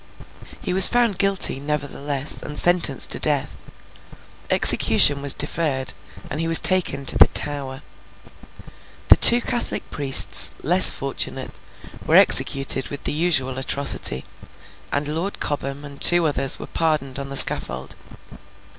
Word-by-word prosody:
He 180 - -6
was 190 0 +7
found 240 -5 -3
guilty, 195 -8 +2
nevertheless, 145 -1 -5
and 150 0 -10
sentenced 175 -7 0
to - - -3
death. - - -3 0.9
Execution 145 -1 +3
was 140 -1 +1
deferred, 145 -3 -3 0.3
and 150 - -8
he 165 - -5
was 165 0 +4
taken 170 -7 -1
to - - +1
the - - +5
Tower. 140 -2 -3 1.3
The - - +6
two 240 +1 +5
Catholic 240 - -5
priests, 135 -3 +3
less - - +6
fortunate, - - -7 0.4
were - - -2
executed 135 -1 +2
with 145 - -11
the - - -4
usual 140 -5 -3
atrocity; 135 - -4 0.7
and 145 +1 -5
Lord 165 +7 -7
Cobham 140 0 -8
and 140 -1 -15
two 175 -1 +3
others 135 -3 0
were - - -11
pardoned 150 -5 -5
on 140 0 -10
the 140 - -2
scaffold. 65 - +2
145 Hz, 135 wpm, -18 LUFS, 135-165 Hz, 1.3 s, was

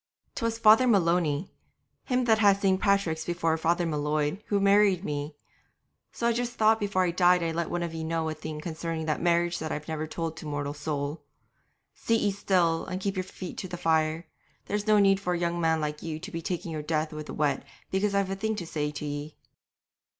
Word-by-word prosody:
''Twas 230 0 -2
Father 220 +3 +6
Maloney, 170 -6 +2 0.5
him 255 -1 +1
that 220 -2 +4
had 200 -2 +5
St. 190 -1 +2
Patrick's 195 -6 +1
before 165 -1 0
Father 170 +2 +1
M'Leod, 150 +2 -1
who 205 - +1
married 200 -1 +4
me; 145 +1 -4 0.8
so 235 - -4
I 235 - +3
just 240 +1 -2
thought 220 -1 +3
before 200 -3 +1
I 175 - +1
died 180 0 +4
I'd 165 -1 -1
let 170 0 -2
one 175 0 -2
of 170 -1 -4
ye 160 0 -4
know 160 0 -1
a 155 - -2
thing 155 0 -7
concerning 165 0 -4
that 155 -1 -1
marriage 175 0 +2
that 155 0 -4
I've 150 0 -4
never 155 -1 -3
told 165 0 -4
to 160 - -7
mortal 145 -1 -3
soul. 145 0 -3 0.7
Sit 230 -1 0
ye 205 - +1
still 180 -4 +1
and 185 - -3
keep 195 +1 -2
your 185 - -1
feet 185 -1 -8
to 185 - -5
the 180 -1 -6
fire; 160 -1 +1 0.4
there's 210 +1 -2
no 215 -1 +5
need 195 -1 +4
for 180 -2 -1
a 175 - -1
young 170 0 -1
man 160 -1 +2
like 150 -1 -3
you 160 -2 -4
to 195 +4 -7
be 165 - -4
taking 175 0 -4
your 155 -1 -3
death 155 +1 -1
with 155 0 -6
the - - -6
wet 145 -3 0 0.3
because 200 +1 +1
I've 200 -1 +1
a - - -1
thing 220 +3 -1
to 185 -5 -5
say 150 -2 -2
to 150 0 -6
ye.' 145 +1 -5
170 Hz, 220 wpm, -28 LUFS, 155-195 Hz, 0.8 s, Father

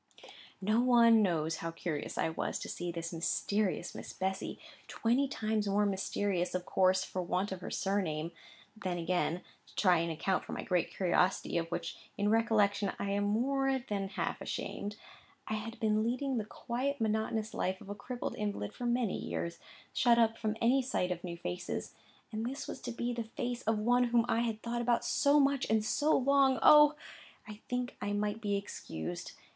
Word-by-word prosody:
No 215 +4 +2
one 235 -3 +6
knows 165 -5 +1
how 165 - -4
curious 165 -2 -4
I - - +1
was 160 - -2
to - - -5
see 175 0 -4
this 170 0 -5
mysterious 185 +2 0
Miss - - -8
Bessy—twenty 225 +6 -2
times 215 -5 -1
more 205 +1 +3
mysterious, 195 -2 -1
of 180 -1 -2
course, 185 0 +3
for 185 - -3
want 180 +3 -1
of 190 -1 -5
her - - -5
surname. 170 -5 -1 0.4
And 220 - -20
then 180 -2 -2
again 175 0 0 0.2
(to - - -20
try 180 -4 +4
and 170 0 -1
account 180 +4 0
for - - -7
my - - -4
great 180 -2 +1
curiosity, 180 0 +1
of 165 - -3
which - - -4 0.2
in 205 0 +1
recollection 210 -3 +2
I 200 - -2
am 205 0 +1
more 270 +5 +1
than 205 -6 -3
half 195 - -3
ashamed), 205 0 -4 0.5
I - - -2
had 220 +2 -5
been 215 -2 +2
leading 250 +3 0
the 210 - -3
quiet 260 +6 -3
monotonous 220 0 0
life 185 +1 -1
of - - -13
a 205 - -4
crippled 245 +4 -5
invalid 205 - -3
for 245 - -4
many 240 -4 +1
years,—shut 170 +7 -1
up 225 -1 +4
from 220 -1 -2
any 250 +4 +4
sight 240 -8 -1
of 175 -1 -3
new 170 -2 -5
faces; 90 - -4 0.4
and 220 +1 -3
this 265 +4 -4
was - - -6
to 245 - -4
be 240 +1 -2
the 235 -1 -3
face 245 +2 -4
of 225 -1 +3
one 245 +3 +3
whom 235 -1 +3
I 230 - +2
had 225 -2 -2
thought 240 0 -2
about 240 0 +1
so 285 0 +4
much 275 -1 +2
and 220 -1 +2
so 300 +7 +3
long,—Oh! 280 +2 +6 0.5
I 210 -1 -9
think 250 0 -2
I 205 - -1
might 210 +1 -1
be 205 -2 0
excused. 85 - -6
215 Hz, 185 wpm, -32 LUFS, 185-240 Hz, 0.5 s, one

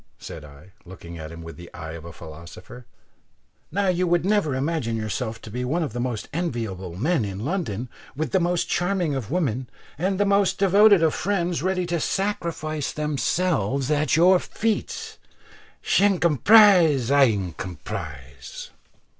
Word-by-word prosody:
said 85 -4 -9
I, 75 +5 -15
looking 85 -2 -10
at 80 0 -7
him 85 0 -9
with 80 0 -10
the 85 0 -11
eye 80 -1 -7
of 85 0 -9
a 85 - -8
philosopher; 85 +9 -12 0.8
"now 200 +4 0
you 180 0 +1
would 175 0 +2
never 195 -9 +1
imagine 135 -5 -1
yourself 110 +1 -3
to 110 - -10
be 125 +3 -3
one 155 +7 0
of 140 -8 -4
the 120 - -4
most 120 -3 -3
enviable 115 - -3
men 145 - +1
in 100 +2 -5
London, 135 - -2 0.3
with 150 -2 -3
the - - +3
most 175 0 0
charming 175 -4 0
of 130 -6 -4
women 130 -8 -1 0.3
and 190 +3 0
the 205 - +3
most 200 -1 +2
devoted 200 -1 +5
of 160 - +3
friends 175 -4 -1
ready 185 +1 0
to 170 -1 -1
sacrifice 165 -6 -2
themselves 150 - 0
at 150 -2 +2
your 180 +3 +5
feet 220 +3 -3 0.6
she - - +3
incomprise, 175 - +5
I 140 -1 +6
incompris." 90 - -6
145 Hz, 155 wpm, -24 LUFS, -, 0.8 s, I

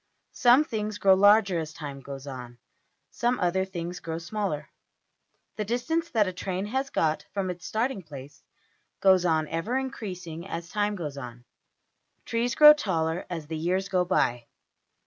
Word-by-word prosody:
Some 250 +3 +5
things 215 -6 -4
grow 195 -2 +5
larger 200 -2 +5
as 155 -1 -5
time 145 -3 -7
goes 135 0 -8
on; 125 -3 -8 0.5
some 245 +1 0
other 185 +1 +1
things 175 -2 -5
grow 165 -1 -5
smaller. 170 -4 -3 0.9
The 215 - -1
distance 320 +10 -1
that 220 -3 +2
a 185 - -3
train 185 +1 -3
has 265 +6 -2
got 155 - 0
from 190 -2 -1
its 175 -1 -8
starting 225 -1 -1
place 140 -3 -11 0.6
goes 190 -2 +5
on 160 -2 +2
ever 165 +10 -1
increasing 185 -10 -5
as 170 -2 -6
time 210 +1 0
goes 150 -6 -5
on. 120 -2 -9 0.8
Trees 235 +1 -1
grow 300 0 +10
taller 170 - -2
as 165 -4 -5
the 160 +1 -5
years 185 +4 -1
go 185 -2 +2
by. 120 -10 0
180 Hz, 160 wpm, -27 LUFS, 160-210 Hz, 0.9 s, grow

